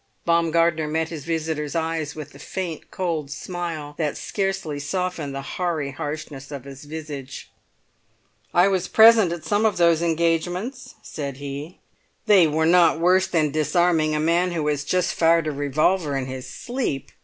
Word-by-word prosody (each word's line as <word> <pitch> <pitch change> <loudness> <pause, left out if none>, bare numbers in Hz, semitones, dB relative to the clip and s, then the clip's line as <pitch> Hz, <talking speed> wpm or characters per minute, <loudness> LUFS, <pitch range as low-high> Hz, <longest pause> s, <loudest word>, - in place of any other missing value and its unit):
Baumgartner 165 -1 +2
met 160 +1 -1
his 155 -4 -7
visitor's 160 -2 -2
eyes 160 -2 -2
with 155 -3 -8
the 140 - -15
faint 175 +1 -5
cold 165 -6 -2
smile 160 -1 -5
that 150 -3 -1
scarcely 195 -7 -2
softened 160 -2 -3
the 140 - -4
hoary 165 -7 -2
harshness 145 -1 -6
of 140 -4 -7
his 135 +1 -11
visage. 145 -3 -7 1.0
"I 175 +2 +5
was 190 -2 0
present 220 -5 +6
at 170 -3 -5
some 205 +6 +1
of 220 -2 +2
those 170 -2 +4
engagements," 170 - -1
said 140 -3 -6
he. 145 +4 -7 0.5
"They 200 -6 +6
were 155 +1 +1
not 170 -1 +5
worse 185 +2 +4
than 155 -3 +1
disarming 155 0 +2
a - - 0
man 170 +3 +2
who 160 -3 -2
has 145 -1 -1
just 180 +4 0
fired 165 0 +3
a 155 - -1
revolver 145 +2 +1
in 135 - -2
his 130 -1 -7
sleep!" 240 - -4
160 Hz, 160 wpm, -23 LUFS, 150-175 Hz, 1.0 s, present